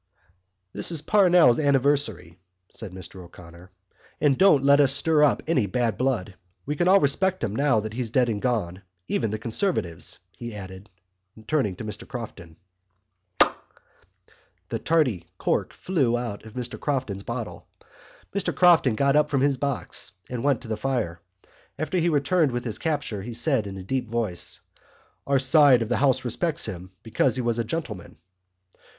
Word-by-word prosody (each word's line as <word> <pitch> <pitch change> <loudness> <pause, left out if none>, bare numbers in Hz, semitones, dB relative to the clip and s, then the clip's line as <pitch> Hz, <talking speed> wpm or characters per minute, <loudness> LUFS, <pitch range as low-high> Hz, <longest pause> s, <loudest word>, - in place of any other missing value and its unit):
"This - - -3
is 155 -3 -2
Parnell's 180 - +5
anniversary," 135 - +1 0.3
said 110 -5 -8
Mr 95 0 -9
O'Connor, 85 +1 -14 0.5
"and 145 -3 +3
don't 150 -5 +5
let 140 +1 +5
us 140 -3 +5
stir 150 +2 +3
up 150 - +3
any 130 -10 +1
bad 115 +2 0
blood. 125 -8 -1 0.3
We 150 - -2
all 185 +3 +5
respect 185 +5 +1
him 105 -2 -2
now 135 -3 +2
that 110 0 -6
he's 120 -1 -3
dead 125 +2 +2
and 105 -3 -2
gone—even 95 -3 -3
the 110 - -3
Conservatives," 110 - -2
he 120 -2 -8
added, 95 +1 -9 0.6
turning 115 -7 0
to - - -8
Mr 105 0 -7
Crofton. 105 -10 -8 0.8
Pok! - - 0 0.9
The - - -3
tardy 130 - +1
cork - - -1
flew 135 -10 0
out 115 -3 -5
of 110 - -12
Mr 125 -1 -5
Crofton's 130 -9 -2
bottle. 115 +1 -6 0.7
Mr 200 -1 -1
Crofton 170 -10 +5
got 140 +3 +2
up 150 0 +3
from 140 -2 +1
his 140 -1 +2
box 140 -1 -2 0.2
and 125 -2 -4
went 140 -4 +2
to - - -10
the 110 -1 -3
fire. 110 -12 -2 0.6
As 155 0 -3
he 175 -2 +2
returned 150 0 +2
with 120 0 -3
his 110 -4 -4
capture 145 -10 -2
he 115 +4 -7
said 120 -2 0
in 95 -1 -7
a 95 - -7
deep 125 +3 -3
voice: 110 -6 -2 0.7
"Our 140 0 +3
side 135 -2 +5
of 115 - -7
the 125 - +1
house 130 -2 +2
respects 155 +7 0
him, 95 -4 -6
because 120 +3 +1
he 130 - -2
was 120 0 0
a - - +1
gentleman." 115 - -6
125 Hz, 165 wpm, -25 LUFS, 105-145 Hz, 0.9 s, Parnell's